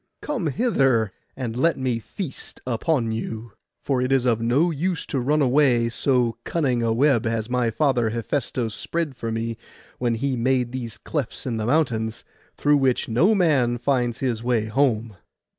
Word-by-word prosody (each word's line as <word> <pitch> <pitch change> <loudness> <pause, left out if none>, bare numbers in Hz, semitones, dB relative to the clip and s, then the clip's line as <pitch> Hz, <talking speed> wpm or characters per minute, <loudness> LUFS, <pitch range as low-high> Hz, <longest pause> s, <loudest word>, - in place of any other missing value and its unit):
Come 255 - -2
hither, 135 - +2 0.3
and 120 -4 -3
let 165 +7 +2
me 130 -3 -1
feast 160 - -7
upon 125 0 0
you; 110 0 -5 0.3
for 130 -3 0
it 125 +1 0
is 135 -2 +3
of 115 -2 +2
no 135 +9 +2
use 175 +3 -2
to 135 - -2
run 145 +4 +2
away, 125 -3 +3
so 120 -2 +1
cunning 135 -8 0
a 115 -1 +1
web 125 0 +3
has 115 +1 -2
my 125 -2 +2
father 120 -2 +1
Hephaistos 115 0 -2
spread 165 +2 -3
for 115 -2 -4
me 115 0 -3 0.4
when 120 -2 +1
he 135 +3 -1
made 125 0 +1
these 120 -4 -5
clefts 145 -3 -4
in 120 -3 -2
the 110 0 -2
mountains, 115 -6 0 0.3
through 145 0 +4
which 130 -4 +1
no 170 - +4
man 140 -10 +2
finds 120 -2 0
his 120 -4 -1
way 120 -2 +1
home. 115 -3 0
125 Hz, 170 wpm, -23 LUFS, 115-140 Hz, 0.4 s, through